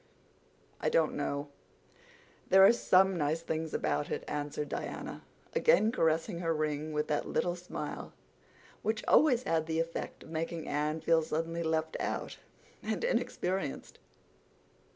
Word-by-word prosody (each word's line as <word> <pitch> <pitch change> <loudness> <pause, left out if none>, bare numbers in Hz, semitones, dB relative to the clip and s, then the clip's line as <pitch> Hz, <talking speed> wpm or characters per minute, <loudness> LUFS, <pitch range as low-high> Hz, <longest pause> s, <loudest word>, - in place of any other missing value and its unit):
"I - - +1
don't - - +2
know—there 190 - -1
are 215 - +8
some 190 -4 +4
nice 160 0 0
things 160 -1 -2
about 145 - -1
it," - - -3
answered 150 0 -3
Diana, - - -5 0.3
again 225 - +4
caressing 165 -3 +1
her 165 -2 0
ring 155 0 -2
with 150 0 -1
that 150 - 0
little 175 0 0
smile 175 0 -6 0.7
which 220 0 -1
always 255 -5 +5
had 160 -5 0
the 160 0 0
effect 165 0 -4
of - - -13
making 165 0 -3
Anne 150 +2 -1
feel 165 0 +4
suddenly 165 +2 -2
left 160 -1 -1
out - - -3 0.4
and - - -2
inexperienced. 190 - -2
165 Hz, 130 wpm, -31 LUFS, 155-190 Hz, 0.7 s, are